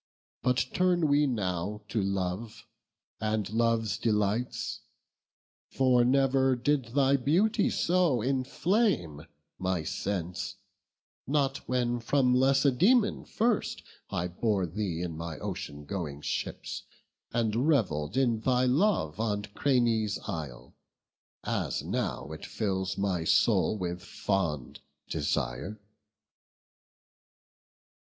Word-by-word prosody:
But 125 Hz, 0 st, +2 dB
turn 180 Hz, -3 st, +3 dB
we 145 Hz, +1 st, +4 dB
now 100 Hz, -3 st, -2 dB
to 110 Hz, -, 0 dB
love, 95 Hz, +3 st, -3 dB, 0.5 s
and 110 Hz, -1 st, -1 dB
love's 115 Hz, -3 st, +1 dB
delights; 105 Hz, +2 st, 0 dB, 0.9 s
For 130 Hz, -2 st, +3 dB
never 135 Hz, +1 st, +3 dB
did 135 Hz, +2 st, +1 dB
thy 140 Hz, 0 st, +4 dB
beauty 195 Hz, -, +2 dB
so 175 Hz, -7 st, +2 dB
inflame 130 Hz, -, 0 dB, 0.3 s
My 95 Hz, -3 st, -1 dB
sense; 90 Hz, +1 st, -3 dB, 0.7 s
not 140 Hz, -1 st, +1 dB
when 120 Hz, -1 st, +1 dB
from 125 Hz, +2 st, +2 dB
Lacedaemon 140 Hz, -, +3 dB
first 225 Hz, -1 st, 0 dB, 0.3 s
I 90 Hz, -, -1 dB
bore 95 Hz, +2 st, 0 dB
thee 90 Hz, -1 st, -3 dB
in 85 Hz, -3 st, -4 dB
my 80 Hz, 0 st, -5 dB
ocean 90 Hz, -8 st, -6 dB
going 75 Hz, -4 st, -4 dB
ships, -, -, -4 dB, 0.5 s
And 115 Hz, +3 st, +1 dB
revell'd 100 Hz, -, +1 dB
in 120 Hz, -4 st, +2 dB
thy 125 Hz, +2 st, +2 dB
love 135 Hz, -, +2 dB
on 105 Hz, -2 st, 0 dB
Cranae's 115 Hz, -6 st, +2 dB
isle, -, -, -6 dB, 0.7 s
As -, -, -2 dB
now 70 Hz, -, -3 dB
it 80 Hz, -, -8 dB
fills 95 Hz, -3 st, -2 dB
my 95 Hz, -4 st, 0 dB
soul 105 Hz, -, +3 dB
with 90 Hz, -2 st, -3 dB
fond 80 Hz, -10 st, -2 dB, 0.3 s
desire." 80 Hz, -, -2 dB
110 Hz, 105 wpm, -29 LUFS, 90-135 Hz, 0.9 s, we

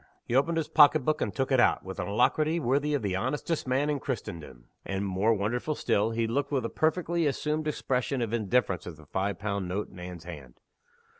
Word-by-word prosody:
He -, -, -4 dB
opened 145 Hz, +6 st, +2 dB
his 160 Hz, -, 0 dB
pocket 145 Hz, -2 st, +6 dB
book, 155 Hz, 0 st, +1 dB
and -, -, 0 dB
took 135 Hz, 0 st, -2 dB
it 130 Hz, -, +4 dB
out, 120 Hz, -, +3 dB
with 95 Hz, 0 st, -7 dB
an -, -, -2 dB
alacrity 155 Hz, +10 st, +2 dB
worthy 145 Hz, +2 st, +1 dB
of 140 Hz, -, -2 dB
the 95 Hz, -2 st, -1 dB
honestest 150 Hz, -, -2 dB
man 130 Hz, +3 st, +1 dB
in 150 Hz, -2 st, 0 dB
Christendom 80 Hz, -, -6 dB, 0.2 s
and 95 Hz, +1 st, -3 dB
(more 95 Hz, +4 st, +1 dB
wonderful 120 Hz, +9 st, -1 dB
still) 105 Hz, -4 st, +1 dB
he 115 Hz, 0 st, 0 dB
looked 140 Hz, +6 st, -1 dB
with 130 Hz, -5 st, 0 dB
a -, -, -2 dB
perfectly 170 Hz, 0 st, +1 dB
assumed 150 Hz, +2 st, -1 dB
expression 135 Hz, -2 st, -1 dB
of 115 Hz, -2 st, -2 dB
indifference 110 Hz, -5 st, 0 dB
at 85 Hz, -3 st, -7 dB
the 80 Hz, -, -15 dB
five 95 Hz, +4 st, -2 dB
pound 100 Hz, -2 st, -2 dB
note 100 Hz, +4 st, -3 dB
in 90 Hz, -, -12 dB
Anne's 90 Hz, -2 st, -8 dB
hand. 75 Hz, -8 st, -10 dB
120 Hz, 215 wpm, -28 LUFS, 95-145 Hz, 0.2 s, pocket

